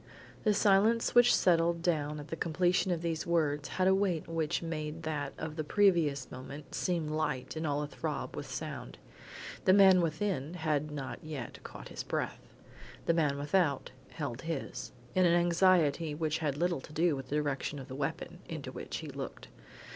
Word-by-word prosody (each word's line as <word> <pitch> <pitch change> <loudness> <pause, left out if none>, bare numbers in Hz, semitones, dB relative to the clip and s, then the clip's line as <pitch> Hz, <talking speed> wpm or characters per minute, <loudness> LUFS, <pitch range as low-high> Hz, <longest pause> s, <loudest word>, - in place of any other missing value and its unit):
The 210 - +5
silence 210 +4 +4
which 245 0 +7
settled 170 -1 +3
down 150 -3 0
at 145 - -9
the - - -3
completion 175 +3 +1
of 170 -2 -1
these 165 -1 -2
words 150 -4 +1
had 185 0 +3
a 190 - +6
weight 190 -4 +1
which 165 -1 -1
made 160 0 -4
that 145 -3 -2
of 160 0 -5
the 155 - -1
previous 160 -7 +2
moment 135 +4 -9
seem 170 -4 0
light 150 -4 -2
and 160 0 -2
all 145 0 0
athrob 145 - -4
with - - -6
sound. - - -6 0.7
The 185 - +6
man 190 -2 +7
within 165 -2 -1
had 155 -3 0
not 140 -3 -6
yet 150 -6 -6
caught - - -9
his - - -5
breath; - - -3 0.6
the 165 - +3
man 150 -4 +2
without 145 0 +1 0.2
held 140 -6 -5
his, 165 -4 -4 0.2
in 185 -1 +4
an 170 - +4
anxiety 170 -3 +3
which 155 0 -1
had 145 -4 -1
little 170 -3 0
to 150 - -12
do 165 0 +2
with 135 -1 -7
the 145 - -1
direction 145 -1 -1
of 135 - -8
the 130 - -8
weapon, 140 - -4
into - - -5
which - - -5
he - - -6
looked. - - -7
160 Hz, 180 wpm, -32 LUFS, 145-175 Hz, 0.7 s, which